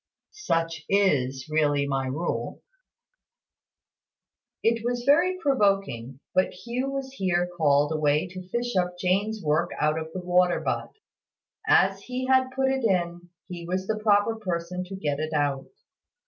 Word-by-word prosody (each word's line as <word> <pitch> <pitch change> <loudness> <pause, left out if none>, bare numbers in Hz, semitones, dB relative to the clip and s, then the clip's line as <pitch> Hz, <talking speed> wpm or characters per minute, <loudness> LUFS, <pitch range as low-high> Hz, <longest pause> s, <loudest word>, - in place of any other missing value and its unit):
"Such 165 - -2
is 135 -10 +1
really 145 -2 +2
my 135 -1 -1
rule." 150 +7 -3 2.0
It 230 0 +2
was 245 0 -1
very 345 +7 +4
provoking, 195 - 0
but 185 - +2
Hugh 240 +7 -3
was 275 -1 -4
here 180 -6 0
called 145 -2 +3
away 150 +1 +1
to 185 0 -9
fish 240 +1 -2
up 180 -1 0
Jane's 200 +4 0
work 155 +3 +1
out 155 +1 +1
of 160 0 -7
the 185 - -5
water 180 0 +2
butt. - - -2 0.8
As - - +4
he 255 +1 -4
had 260 0 +3
put 265 0 +2
it 265 -1 -1
in, 175 -4 0 0.2
he 175 -2 -7
was 185 +1 -2
the 215 +1 -2
proper 215 +1 +3
person 180 -3 -3
to 195 +2 -7
get 145 -6 -2
it 155 0 -3
out. 145 -2 0
180 Hz, 145 wpm, -26 LUFS, 155-225 Hz, 2.0 s, very